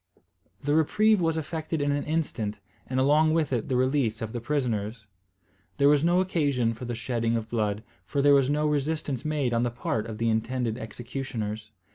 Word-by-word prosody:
The 145 Hz, +1 st, +1 dB
reprieve 210 Hz, +7 st, +3 dB
was 165 Hz, -1 st, +1 dB
effected 160 Hz, 0 st, -3 dB
in 145 Hz, 0 st, +1 dB
an 145 Hz, 0 st, -1 dB
instant, 120 Hz, -10 st, -2 dB, 0.3 s
and 130 Hz, 0 st, -1 dB
along 155 Hz, +4 st, +4 dB
with 155 Hz, -5 st, +1 dB
it 120 Hz, -3 st, -1 dB
the 130 Hz, -, +1 dB
release 130 Hz, -3 st, +1 dB
of 110 Hz, -1 st, -5 dB
the 120 Hz, -, -3 dB
prisoners. 115 Hz, -5 st, -2 dB, 0.7 s
There 140 Hz, 0 st, +5 dB
was 145 Hz, 0 st, +4 dB
no 175 Hz, +2 st, +4 dB
occasion 145 Hz, -10 st, +1 dB
for 115 Hz, +3 st, -8 dB
the 120 Hz, 0 st, -3 dB
shedding 115 Hz, -1 st, -1 dB
of 110 Hz, 0 st, -5 dB
blood, 105 Hz, -2 st, -1 dB, 0.2 s
for 140 Hz, -, -3 dB
there 145 Hz, +1 st, +6 dB
was 135 Hz, -1 st, +4 dB
no 150 Hz, +1 st, +1 dB
resistance 145 Hz, -3 st, -1 dB
made 150 Hz, -5 st, 0 dB
on 115 Hz, -, +2 dB
the 120 Hz, -, +1 dB
part 115 Hz, -2 st, -2 dB
of 110 Hz, -2 st, -6 dB
the 115 Hz, 0 st, +1 dB
intended 115 Hz, +1 st, -1 dB
executioners. 110 Hz, -2 st, -5 dB
130 Hz, 190 wpm, -27 LUFS, 115-150 Hz, 0.7 s, there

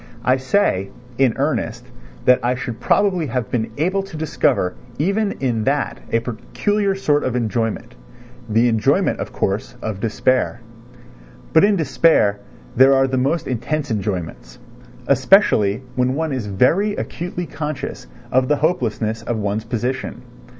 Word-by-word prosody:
I 130 Hz, +1 st, +4 dB
say, 130 Hz, -, +1 dB, 0.3 s
in 130 Hz, -4 st, +4 dB
earnest, -, -, -1 dB, 0.4 s
that 125 Hz, 0 st, +6 dB
I 125 Hz, +1 st, +1 dB
should 125 Hz, -2 st, -5 dB
probably 185 Hz, -6 st, +2 dB
have 120 Hz, -3 st, -3 dB
been 115 Hz, -2 st, -1 dB
able 185 Hz, +6 st, +1 dB
to 195 Hz, -5 st, -9 dB
discover 135 Hz, -11 st, +1 dB, 0.2 s
even 200 Hz, +6 st, 0 dB
in 120 Hz, -5 st, -1 dB
that 140 Hz, +1 st, 0 dB
a 115 Hz, -, +2 dB
peculiar 195 Hz, -, -1 dB
sort 150 Hz, -6 st, +1 dB
of 125 Hz, -, -1 dB
enjoyment—the 115 Hz, -, -2 dB
enjoyment, 115 Hz, -2 st, +2 dB
of -, -, -4 dB
course, 100 Hz, +2 st, -2 dB
of 110 Hz, -3 st, -4 dB
despair; 120 Hz, +3 st, 0 dB, 0.9 s
but 160 Hz, -, +6 dB
in 205 Hz, 0 st, +4 dB
despair 130 Hz, -, +3 dB, 0.4 s
there 135 Hz, +2 st, +6 dB
are 135 Hz, 0 st, +4 dB
the 130 Hz, 0 st, -1 dB
most 140 Hz, +6 st, 0 dB
intense 135 Hz, +3 st, -2 dB
enjoyments, 95 Hz, -, -4 dB, 0.5 s
especially 130 Hz, -, +4 dB
when 130 Hz, +1 st, +1 dB
one 160 Hz, -1 st, -1 dB
is 125 Hz, -5 st, -3 dB
very 165 Hz, -, +2 dB
acutely 175 Hz, -1 st, -4 dB
conscious 150 Hz, -, -5 dB, 0.2 s
of 130 Hz, 0 st, +3 dB
the 150 Hz, -, +3 dB
hopelessness 115 Hz, -8 st, -1 dB
of 115 Hz, 0 st, -3 dB
one's 105 Hz, +1 st, -2 dB
position. 120 Hz, +3 st, -3 dB
130 Hz, 140 wpm, -20 LUFS, 110-155 Hz, 0.9 s, that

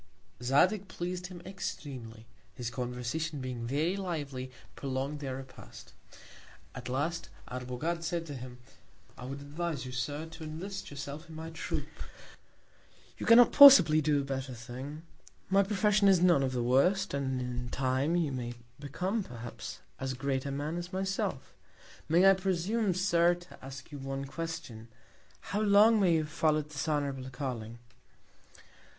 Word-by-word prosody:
Zadig 180 Hz, +11 st, +3 dB
pleas'd 180 Hz, 0 st, -4 dB
him 175 Hz, -2 st, -10 dB
extremely; 130 Hz, -, -6 dB, 0.3 s
his 120 Hz, -3 st, -4 dB
Conversation 125 Hz, +6 st, -3 dB
being 125 Hz, -3 st, -4 dB
very 155 Hz, +8 st, +1 dB
lively, 145 Hz, -9 st, -4 dB, 0.3 s
prolong'd 135 Hz, +2 st, -3 dB
their 135 Hz, -3 st, -4 dB
Repast: 130 Hz, 0 st, -11 dB, 0.8 s
At -, -, -7 dB
last, 160 Hz, +6 st, -2 dB, 0.2 s
Arbogad 125 Hz, +7 st, -3 dB
said 170 Hz, 0 st, -2 dB
to 145 Hz, -, -7 dB
him; 125 Hz, -1 st, -8 dB, 0.6 s
I 125 Hz, -, -9 dB
would 135 Hz, +2 st, -6 dB
advise 150 Hz, 0 st, -4 dB
you, 130 Hz, -, -6 dB
Sir, 145 Hz, +5 st, -3 dB
to 160 Hz, 0 st, -10 dB
enlist 185 Hz, +5 st, -6 dB
yourself 145 Hz, +3 st, -7 dB
in 160 Hz, -, -10 dB
my 160 Hz, +1 st, -6 dB
Troop; 160 Hz, -, -4 dB, 1.3 s
you -, -, -4 dB
cannot 235 Hz, +1 st, +8 dB
possibly 260 Hz, -, +9 dB
do 150 Hz, -1 st, +2 dB
a -, -, -4 dB
better 135 Hz, -1 st, -4 dB
Thing: 130 Hz, +6 st, -8 dB, 0.5 s
My 195 Hz, +1 st, +6 dB
Profession 205 Hz, +1 st, +3 dB
is 190 Hz, -2 st, +6 dB
none 175 Hz, -5 st, +5 dB
of 130 Hz, -1 st, 0 dB
the 120 Hz, -1 st, 0 dB
worst; 180 Hz, +11 st, +3 dB
and 135 Hz, -2 st, -1 dB
in 125 Hz, -1 st, -4 dB
Time, 130 Hz, +5 st, 0 dB
you 165 Hz, -5 st, +1 dB
may 120 Hz, -2 st, -4 dB, 0.2 s
become 180 Hz, +10 st, -2 dB
perhaps 120 Hz, -6 st, -8 dB, 0.2 s
as 130 Hz, -1 st, -3 dB
great 135 Hz, +1 st, -2 dB
a -, -, -2 dB
Man 145 Hz, +4 st, -3 dB
as 175 Hz, +1 st, -5 dB
myself. 190 Hz, -, -2 dB, 0.6 s
May 175 Hz, +4 st, +6 dB
I 195 Hz, -, +9 dB
presume, 190 Hz, +2 st, 0 dB
Sir, 175 Hz, -2 st, +3 dB
to 175 Hz, 0 st, -15 dB
ask 135 Hz, +2 st, -9 dB
you 145 Hz, -, -7 dB
one 135 Hz, 0 st, -4 dB
Question; 135 Hz, -8 st, -6 dB, 0.7 s
how 205 Hz, -, +1 dB
long 215 Hz, +2 st, +6 dB
may 185 Hz, -4 st, +4 dB
you -, -, +3 dB
have 150 Hz, -, -8 dB
follow'd 155 Hz, -2 st, +1 dB
this 140 Hz, -1 st, -3 dB
honourable 140 Hz, -3 st, -1 dB
Calling? 125 Hz, -4 st, -5 dB
150 Hz, 155 wpm, -31 LUFS, 130-175 Hz, 1.3 s, possibly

